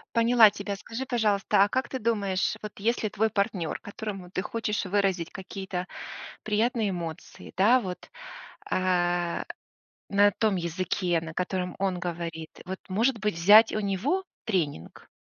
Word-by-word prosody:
Поняла 230 -1 +7
тебя. 200 0 -5
Скажи, 230 +6 -6
пожалуйста, 210 -4 +2
а 205 - +1
как 260 +2 -1
ты 260 - -4
думаешь, 200 -4 0
вот 210 -1 -7
если 220 0 0
твой 220 +2 +1
партнер, 200 -6 -1
которому 200 -3 -7
ты 185 - -1
хочешь 210 -2 -2
выразить 190 -3 0
какие-то 190 -1 -5 0.6
приятные 220 0 +1
эмоции, 170 -4 -7
да, 235 +7 +5
вот, 180 -3 -7 0.6
а, 175 -2 +1 0.6
на 205 +1 +5
том 215 -4 +2
языке, 175 0 -1
на 165 -1 -8
котором 180 -1 -2
он 190 -2 0
говорит, 165 -2 -5
вот, 190 +1 -5
может 230 +6 +1
быть, 210 -3 -1
взять 210 +7 +7
у 215 - -1
него 220 - 0 0.2
тренинг? 160 - -3
195 Hz, 140 wpm, -27 LUFS, 180-220 Hz, 0.6 s, Поняла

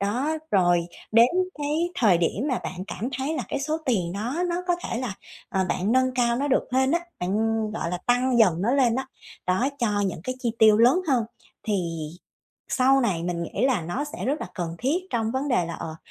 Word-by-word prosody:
Đó, 250 +11 0
rồi 175 -3 +3 0.3
đến 230 +2 +7 0.3
cái 305 +4 0
thời 200 -8 +4
điểm 205 - 0
mà 255 - 0
bạn 185 +1 -5
cảm 235 +4 -4
thấy 285 +5 -1
là - - -1
cái - - -2
số 310 +3 -1
tiền 180 -8 +1
đó 245 - -2
nó 350 +1 -1
có 350 - +2
thể 230 - -2
là, 250 -6 -3 0.3
ờ, 190 -1 0
bạn 200 +6 0
nâng 255 0 +2
cao 240 -1 +2
nó 285 +2 -1
được 265 - +2
lên 265 +1 +3
á, 340 - +2 0.2
bạn, 180 +2 -2 0.4
gọi 190 -5 -3
là, 180 - -2
tăng 245 0 +2
dần 185 -6 +4
nó 235 +5 +2
lên 250 -4 +3
á, 265 +1 -2 0.4
đó, 190 +9 +2
cho 210 -5 +1
những 175 -3 -4
cái 255 - -2
chi 235 -2 -1
tiêu 215 -1 +7
lớn 250 +10 +5
hơn, 245 -5 +3 0.4
thì 170 -7 -2 0.6
sau 270 +1 +4
này 190 -9 0
mình 170 -1 -2
nghĩ 205 +9 0
là 245 -9 +2
nó 175 - -3
sẽ 295 - -6
rất 285 +5 -1
là - - -4
cần 170 -2 -3
thiết 275 +7 +1
trong 225 -2 0
vấn 270 +2 -1
đề 240 -9 +2
là, 170 - -5
ờ, 160 0 -6
235 Hz, 225 wpm, -25 LUFS, 185-265 Hz, 0.6 s, đến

